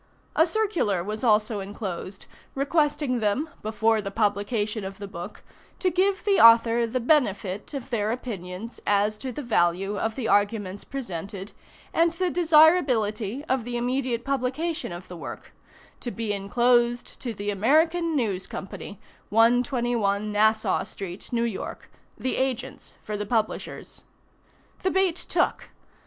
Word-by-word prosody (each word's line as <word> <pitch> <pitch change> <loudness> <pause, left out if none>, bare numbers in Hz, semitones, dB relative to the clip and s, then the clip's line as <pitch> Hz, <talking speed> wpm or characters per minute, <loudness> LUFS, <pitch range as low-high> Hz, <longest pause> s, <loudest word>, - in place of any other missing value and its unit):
A 320 - +5
circular 330 - 0
was 215 +4 -5
also 215 -2 +3
enclosed, 195 -1 -6 0.3
requesting 285 -2 +1
them, 220 +9 0
before 220 +1 +1
the 200 - -4
publication 210 +1 0
of 195 0 -6
the 200 -1 -7
book, 175 -2 -8 0.3
to 370 - +1
give 380 +3 +1
the 405 -2 +3
author 230 0 +7
the 250 +3 -1
benefit 215 -5 +1
of 265 -1 -6
their 215 -2 0
opinions 220 -3 -6
as 205 +1 +3
to 260 - -4
the 290 +5 -6
value 195 -2 +1
of 220 0 -1
the 250 -4 -2
arguments 205 -2 +1
presented, 195 - -6 0.4
and 335 0 +3
the 360 +1 -1
desirability 285 - +3
of 260 -5 0
the 240 +1 -3
immediate 245 -1 -1
publication 275 - -2
of 175 +1 -8
the 180 - -9
work; 170 - -8 0.5
to 245 - -4
be 225 -3 -2
inclosed 240 +4 +1
to 245 - -3
the 205 -1 -3
American 320 - +2
News 205 -8 -1
Company, 195 +1 -7 0.3
121 230 -2 +2
Nassau 215 +1 +2
street, 190 +2 -7
New 235 -1 +1
York 230 -4 -5 0.3
the 260 - -2
agents 260 -2 -3
for 210 - -4
the 210 0 -4
publishers. 220 -1 -2 0.8
The 375 - +1
bait 380 -3 +2
took. - - -1
230 Hz, 140 wpm, -26 LUFS, 205-270 Hz, 0.8 s, author